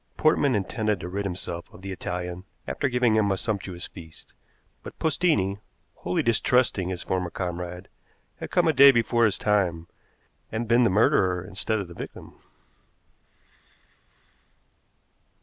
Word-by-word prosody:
Portman 145 -4 +3
intended 105 +1 -1
to 90 - -6
rid 100 +3 -3
himself 90 -2 -5
of 90 - -15
the 95 - -5
Italian 90 0 -5 0.2
after 140 - -1
giving 125 -3 +2
him 105 -2 +2
a 95 - 0
sumptuous 95 -4 -4
feast, 80 -2 -13 0.5
but - - -10
Postini, 140 - +1 0.4
wholly 90 - -1
distrusting 115 -4 +2
his 90 -2 -4
former 90 -1 -2
comrade, 90 +1 -5 0.5
had - - -6
come - - +2
a - - +4
day 140 +1 +9
before 120 -2 +3
his 105 -2 +1
time, 90 -6 +1 0.7
and 115 +1 -3
been 120 +2 +4
the 115 - +4
murderer 95 -3 +2
instead 100 +4 -2
of 100 -3 -4
the 85 - -11
victim. - - -9
95 Hz, 140 wpm, -26 LUFS, 90-115 Hz, 0.7 s, day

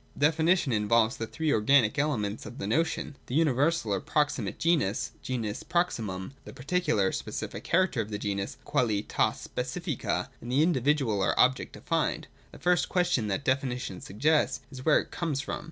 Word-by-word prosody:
Definition 160 +1 +3
involves 110 +2 +2
the 115 - -4
three 160 +3 -1
organic 125 +3 +3
elements 110 -8 -1
of 120 - -10
the - - -4
notion: 155 +4 -1
the 125 - -4
universal 150 -5 +2
or 100 - 0
proximate 145 -8 -1
genus 155 - +1
[genus 115 -5 -3
proximum), 110 - -2
the - - -10
particular 150 - +1
or - - -4
specific - - -5
character 175 -8 +2
of 105 - -6
the 105 - -3
genus 100 -1 -3
(qualitas 115 -8 0
specifica), - - -3
and 120 - -6
the 140 +4 +4
individual, 135 - +2
or 95 - +1
object 130 +1 +3
defined. - - -1
— - - -30
The - - -12
first 180 0 +2
question 170 - +1
that 105 +7 -2
definition 125 -7 -1
suggests, 145 +12 +1
is 130 -2 -8
where 155 - +5
it - - -7
comes 160 -5 -2
from. 145 - -4
130 Hz, 170 wpm, -28 LUFS, 105-155 Hz, -, where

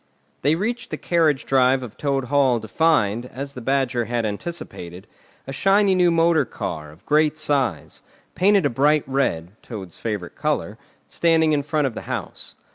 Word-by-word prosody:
They 145 +3 +3
reached 235 +7 -3
the - - -4
carriage 160 -5 +1
drive 130 0 +3
of 115 -4 -9
Toad 140 -2 -1
Hall 135 -2 +2
to 110 - -9
find, 120 -6 +1
as 140 +2 -7
the 125 - -8
Badger 130 -2 0
had 120 0 -1
anticipated, 100 - -6 0.4
a 135 - -6
shiny 195 +5 +3
new 180 -1 +4
motor 165 -1 +3
car, 75 -1 -6
of 80 +6 -18
great 155 0 +2
size, 145 -4 -1 0.3
painted 195 -2 +3
a - - +3
bright 145 +4 +3
red 125 -11 -1
(Toad's 95 -7 -9
favourite 105 -6 -4
colour), - - -2 0.3
standing 160 -2 +2
in 150 -1 +2
front 150 +1 0
of 130 - -1
the - - -6
house. - - -6
140 Hz, 170 wpm, -22 LUFS, 120-160 Hz, 0.4 s, new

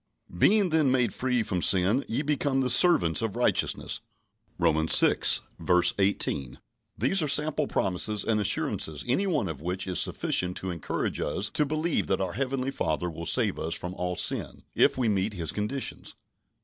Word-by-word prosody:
"Being 200 - +3
then 155 -4 +2
made 125 -5 +1
free 125 -2 -1
from 95 -4 -3
sin, 95 +10 +2
ye 120 +6 -2
became 140 -2 0
the 125 -1 0
servants 120 - +5
of 110 -3 -3
righteousness" 120 -2 0 0.6
(Romans 80 -2 +2
vi. 90 +2 +2 0.2
18). 75 -10 -1 0.4
These 140 - +1
are 155 - -1
sample 150 +1 +2
promises 100 +3 -1
and 110 -2 0
assurances 80 -5 -1
any 185 +11 0
one 145 - -1
of 80 -4 -7
which 90 +3 -3
is 90 -3 -1
sufficient 90 0 0
to 95 - -4
encourage 85 -3 -4
us 100 +8 -1
to 150 - 0
believe 155 +2 -1
that 95 - 0
our 95 -2 -3
Heavenly 135 +2 -2
Father 85 - -2
will 85 +1 -8
save - - +2
us 85 +1 -2
from 90 +1 -5
all 90 -1 -4
sin, - - -1
if - - +2
we 125 -3 0
meet 100 0 0
His 85 -6 -2
conditions. 105 +6 -3
105 Hz, 170 wpm, -26 LUFS, 90-135 Hz, 0.6 s, servants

